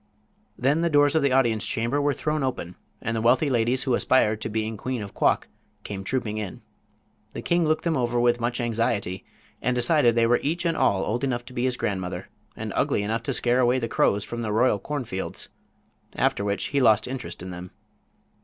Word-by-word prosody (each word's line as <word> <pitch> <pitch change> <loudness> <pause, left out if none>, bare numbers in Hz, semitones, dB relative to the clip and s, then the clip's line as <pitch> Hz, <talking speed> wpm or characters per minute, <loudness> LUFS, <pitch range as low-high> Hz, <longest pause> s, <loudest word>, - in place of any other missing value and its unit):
Then 140 +6 +2
the 170 - +2
doors 145 -2 +4
of 160 - +3
the 140 -1 +2
audience 120 -5 +2
chamber 120 +6 0
were 145 -1 +1
thrown 150 0 -1
open, 125 -10 -3 0.3
and 115 - -1
the 110 - -1
wealthy 130 +5 +3
ladies 120 +1 +1
who 130 - 0
aspired 110 -4 +2
to - - -3
being 110 0 -2
queen 125 +2 -4
of 100 - -9
Quok - - +1 0.4
came 100 -2 -6
trooping 110 -1 -2
in. 100 -4 -6 0.7
The - - -6
king 170 -2 +2
looked 155 0 +1
them 170 -2 +1
over 120 -2 0
with 120 0 +3
much 120 +1 -1
anxiety, 115 -5 -1 0.4
and 125 +1 0
decided 120 -1 +3
they 115 -1 +4
were 120 +1 +3
each 165 +5 -2
and 165 -1 +1
all 95 -9 +2
old 120 +4 -2
enough 120 -3 -1
to 125 - -12
be 120 0 -1
his 125 -1 0
grandmother, 95 -3 -3 0.3
and - - -5
ugly 100 - +1
enough 110 +2 -1
to - - -2
scare 120 +1 +2
away 125 0 +3
the 115 -2 -2
crows 100 -2 +1
from 120 +3 -5
the 110 -2 -2
royal 110 -1 +3
cornfields. 120 -8 -4 0.7
After 100 - +1
which 100 0 -2
he 140 - +3
lost 110 -4 +4
interest 130 -8 -6
in 90 - -6
them. 90 +1 -8
120 Hz, 210 wpm, -25 LUFS, 110-130 Hz, 0.7 s, doors